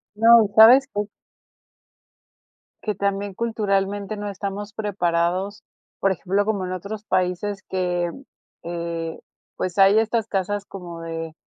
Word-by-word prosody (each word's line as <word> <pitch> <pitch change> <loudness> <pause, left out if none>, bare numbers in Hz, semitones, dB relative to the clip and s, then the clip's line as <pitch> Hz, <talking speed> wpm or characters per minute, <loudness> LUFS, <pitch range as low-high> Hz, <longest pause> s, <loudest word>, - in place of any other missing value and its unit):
No, 230 +1 +7
¿y - - 0
sabes 250 +6 +8
qué? 205 - 0 1.8
Que 210 -2 -2
también 200 0 -2
culturalmente 205 -2 -1
no 205 0 -5
estamos 200 +1 -5
preparados, 185 -1 -1 0.4
por 195 - +2
ejemplo, 195 +3 -1
como 200 -3 -1
en 180 - -5
otros 200 +4 -6
países 185 +1 -1
que, 180 -2 -1
mm, 270 - -12 0.4
eh, 170 -1 -4 0.4
pues, 180 0 -3
hay 195 +2 +6
estas 225 0 0
casas 205 0 -2
como 175 -4 -9
de 165 -1 -5
195 Hz, 130 wpm, -23 LUFS, 180-210 Hz, 1.8 s, sabes